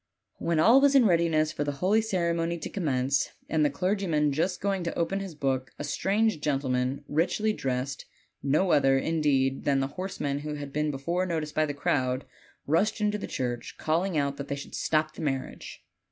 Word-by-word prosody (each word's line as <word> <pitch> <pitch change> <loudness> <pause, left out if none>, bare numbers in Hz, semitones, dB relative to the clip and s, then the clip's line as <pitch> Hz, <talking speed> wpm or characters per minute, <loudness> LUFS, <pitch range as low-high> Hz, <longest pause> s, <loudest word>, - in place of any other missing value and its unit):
When 170 -2 0
all 235 +11 +6
was 280 0 +4
in 260 -4 +7
readiness 165 -4 +3
for 145 - -2
the 145 0 -2
holy 190 +10 +2
cer 185 -6 0
emony 170 0 -1
to - - -5
commence, 140 -6 0
and 155 -1 +1
the 145 - +4
clergyman 165 -1 0
just 180 +5 0
going 195 -1 -1
to 170 - -3
open 180 +4 0
his 195 -4 -6
book, 135 -3 -2
a - - -5
strange 195 +5 0
gentleman, 135 -2 0
richly 190 +8 +1
dressed, 130 -3 -3 0.4
no 155 +7 +2
other, 135 -1 +4
indeed, 135 -3 +1
than 140 -1 +2
the 135 - +1
horseman 145 -7 -2
who 150 +1 -5
had 145 -1 -7
been 150 0 0
before 170 +7 -1
noticed 155 -3 -2
by 155 0 +2
the 145 - -4
crowd, 130 -2 0 0.4
rushed 205 +9 +1
into 210 0 0
the - - -5
church, 120 -2 -4
calling 165 +2 0
out 140 -1 0
that 140 - -6
they 140 - -2
should 140 - -9
stop 155 0 0
the - - -9
marriage. 135 - -4
155 Hz, 195 wpm, -28 LUFS, 140-180 Hz, 0.4 s, in